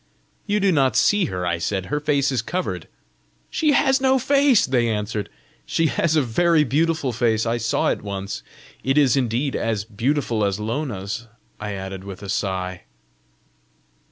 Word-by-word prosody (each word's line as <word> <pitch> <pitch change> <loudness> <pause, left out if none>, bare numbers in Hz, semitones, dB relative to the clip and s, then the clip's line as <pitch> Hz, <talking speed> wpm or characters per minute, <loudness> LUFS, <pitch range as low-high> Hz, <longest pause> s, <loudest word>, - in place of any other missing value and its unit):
"You 210 0 +1
do 195 -1 +3
not 135 -7 +2
see 205 -3 +4
her," 90 -1 -3
I 85 -1 0
said; 95 +1 -2
"her 150 - +2
face 140 -2 +1
is 125 -4 0
covered!" 180 +10 -3 0.6
"She 305 -2 +2
has 270 -2 +3
no 265 0 +4
face!" 275 -2 +4
they 120 -3 +1
answered. 105 -1 -2 0.3
"She 165 - 0
has 160 +1 +1
a 155 - +4
very 160 +7 +3
beautiful 150 +1 +1
face. 115 -1 +1
I 115 +1 0
saw 115 0 +1
it - - -1
once. 100 -1 -5 0.4
It 135 +2 +1
is 140 -4 +5
indeed 130 +1 0
as 110 -3 -1
beautiful 115 +1 -1
as 100 0 0
Lona's!" 110 -2 -3 0.3
I 105 -1 -4
added 95 -1 -6
with 100 0 -9
a 100 - -7
sigh. 95 -2 -2
120 Hz, 165 wpm, -22 LUFS, 100-155 Hz, 0.6 s, is